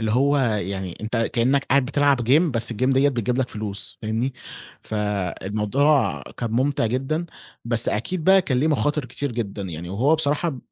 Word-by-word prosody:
اللي 110 -1 -1
هو 140 +5 +3
يعني 100 -7 -2
أنت 110 +2 -3
كإنّك 120 +4 +1
قاعد 140 0 +3
بتلعب 145 -1 +2
game، 150 +6 +6
بس 120 -2 0
الgame - - -8 0.2
ديّة 135 +2 +4
بتجيب 125 -2 -1
لك 130 -2 0
فلوس، 105 -2 -5
فاهمني، 115 +5 -1 0.5
فالموضوع 105 - 0
كان 120 -2 -6
مُمتع 130 +1 +1
جدًا، 135 +8 -2 0.4
بس 115 0 +2
أكيد 155 - -2
بقى 190 0 +6
كان 130 -8 0
ليه 155 - +2
مخاطر 145 -1 0
كتير 125 +2 -4
جدًا، 105 -4 -4
يعني 85 -2 -6
وهو 125 - +2
بصراحة 150 -1 +1
125 Hz, 170 wpm, -23 LUFS, 110-140 Hz, 0.5 s, game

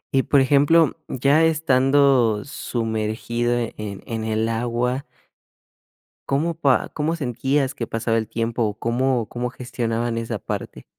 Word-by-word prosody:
Y 135 - +5
por 140 0 +3
ejemplo, 145 +4 +4
ya 140 +5 +3
estando 135 -7 +3
sumergido 115 -1 -2 0.2
en 105 -2 -6
en 110 -1 -4
el 110 0 0
agua. 120 +3 -1 1.2
¿Cómo 155 +5 +1
pa 140 -5 +2
cómo 160 +2 -1
sentías 135 0 -1
que 115 - -3
pasaba 115 0 -1
el 110 -1 -2
tiempo 115 +1 -1
o 105 -2 0
cómo 120 0 0
cómo 125 0 -3
gestionaban 120 -2 -3
esa 115 0 -3
parte? - - -6
120 Hz, 130 wpm, -22 LUFS, 115-140 Hz, 1.2 s, Y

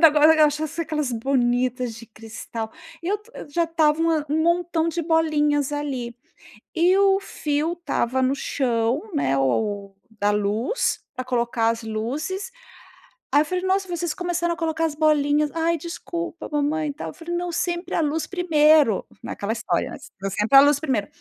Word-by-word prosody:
Ainda, 330 - +10
agora, 310 +1 +6
achasse 310 +2 -3
aquelas 300 -4 -2
bonitas 245 0 0
de 230 0 -11
cristal, 225 0 -7 0.3
eu 400 +5 -1
t 440 +2 -22 0.2
já 340 +4 +1
estava 320 -2 +2
uma 325 -2 +1
um 315 +2 +1
montão 340 -1 +1
de 335 +1 -2
bolinhas 300 -3 +1
ali, 265 -5 -3 0.6
e 350 +3 +4
o 390 -1 +4
fio 305 -3 -2
estava 260 -7 -1
no 260 +2 +2
chão, 245 0 0
né, 135 - +1
o 200 - -1 0.3
da 205 0 +3
luz, 210 - 0
pra 255 - -4
colocar 235 -2 0
as 230 0 -3
luzes. 285 - -3 0.8
Aí 290 +2 +5
eu - - 0
falei: 365 +3 -2
"Nossa, 380 0 +1
vocês 345 -2 -2
começaram 345 -1 -1
a - - -20
colocar 325 0 0
as 300 -2 -2
bolinhas". 300 -1 +2
"Ai, 330 +1 +1
desculpa, 340 +1 -6
mamãe", 300 +1 0
e 285 - -4
tal, 300 - -6
eu - - -9
falei: 345 +1 -5
"Não, 350 0 -2
sempre 345 +1 -2
a - - +2
luz 305 +1 -1
primeiro", 305 - +3 0.2
naquela 200 +2 -4
história, - - -1
né, - - -7
s - - -14 0.2
sempre 220 +6 +4
a - - +11
luz 290 0 +4
primeiro. 260 -10 -1
300 Hz, 175 wpm, -23 LUFS, 250-335 Hz, 0.8 s, a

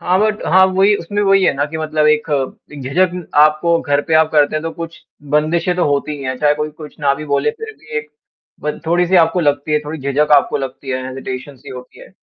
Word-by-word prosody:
हाँ, 180 +1 +1
बट 215 0 0
हाँ 190 +1 +5
वही 195 +2 +3
उसमें 205 +3 -4
वही 195 -1 +4
है - - +3
ना 140 +1 0
कि 160 +2 -7
मतलब 155 -1 0
एक 150 +1 +2
अ, 140 +1 -3
एक 140 -2 -8
झिझक 175 +7 +1 0.3
आपको 155 +2 +3
घर 145 0 +1
पे 160 - +2
आप 160 0 +4
करते 150 0 +3
हैं 155 - -3
तो 165 - -3
कुछ 165 -1 -8 0.4
बंदिशें 165 +4 +1
तो 175 - +1
होती 145 +1 -1
ही 140 - -9
हैं, 130 0 -3
चाहे 150 +1 +3
कोई 150 +1 -3
कुछ 150 0 -12
ना 140 -1 +2
भी 150 - -7
बोले 140 +6 0
फिर 440 - -9
भी - - -8
एक 150 0 -9 0.5
ब 150 +1 -3
थोड़ी-सी 175 +2 +2
आपको 165 +2 +2
लगती 145 0 0
है, 150 - +3
थोड़ी 155 +2 -6
झिझक 140 +2 0
आपको 140 - +1
लगती 135 0 -6
है, 130 0 -2
हेंज़िटेशन्स 130 +1 -7
सी - - -12
ही - - -7
होती 125 0 -12
है। - - -13
150 Hz, 250 wpm, -17 LUFS, 145-170 Hz, 0.5 s, हाँ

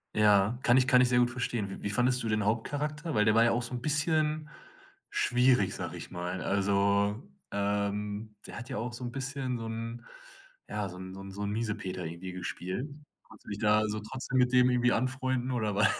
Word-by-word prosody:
Ja, 105 +2 +4
kann 125 -2 +5
ich 130 -1 +4
kann 125 -2 +6
ich 125 - +4
sehr 125 - +3
gut 120 0 +3
verstehen. 120 -4 -2
Wie - - -8
wie 100 - -2
fandest 125 +4 +3
du 115 - -2
den 105 -1 +1
Hauptcharakter? 150 +8 -2
Weil, 105 - +4
der 110 - +4
war 115 +1 +5
ja 120 - +4
auch 120 +1 0
so 120 - -5
'n 120 - -3
bisschen 155 +1 +1 0.6
schwierig, 125 -6 +3
sag - - -4
ich - - -8
mal. 90 +1 -4
Also, 100 +3 +1 0.3
ähm, 105 +1 -2
der - - -7
hat 120 - -9
ja - - -3
auch 120 +3 -3
so 120 +2 -7
'n 120 - -4
bisschen 135 -1 -3
so 115 - -6
'n 115 +1 -5 0.6
ja, 105 -1 -2
so 90 -1 -9
'n 95 0 -8
so - - -9
'n 95 0 -9
so 100 +2 -7
'n 100 - -1
Miesepeter 105 -5 -3
irgendwie 85 +3 -6
gespielt. 90 - -4 0.4
Kannst 110 - -17
du - - -10
dich 100 - -4
da 105 0 +3
so 105 0 -2
trotzdem 130 +4 -4
mit 125 0 +3
dem 125 0 +6
irgendwie 125 -1 +3
anfreunden 130 0 0
oder 110 -4 -1
war 105 +2 +5
115 Hz, 220 wpm, -30 LUFS, 100-125 Hz, 0.6 s, kann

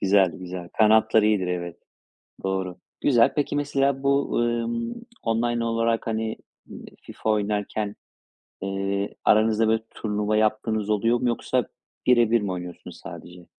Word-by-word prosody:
güzel, 95 -1 +4
güzel. 90 +1 -7
Kanatlar 110 0 +5
iyidir, 105 -3 +2
evet. 85 -1 -3 0.7
Doğru. 95 -2 -2 0.2
Güzel. 120 -5 +4
Peki 145 -1 0
mesela 140 -1 0
bu, 140 0 +1
ımm, 115 0 -1 0.3
online 120 +1 0
olarak, 115 0 0
hani, 110 0 -2 0.3
eee, - - -10 0.2
FIFA - - -5
oynarken, 105 0 -1 0.7
eee, 100 +1 -2
aranızda 110 +1 +4
böyle, 110 0 +2
turnuva 105 0 -1
yaptığınız 110 0 0
oluyor 115 +3 +2
mu 125 - +1
yoksa 120 0 0 0.4
bire 120 -3 +5
bir 115 0 +4
mi 100 -2 -2
oynuyorsunuz 90 -1 -8
sadece? 90 0 -10
110 Hz, 130 wpm, -25 LUFS, 100-115 Hz, 0.7 s, Kanatlar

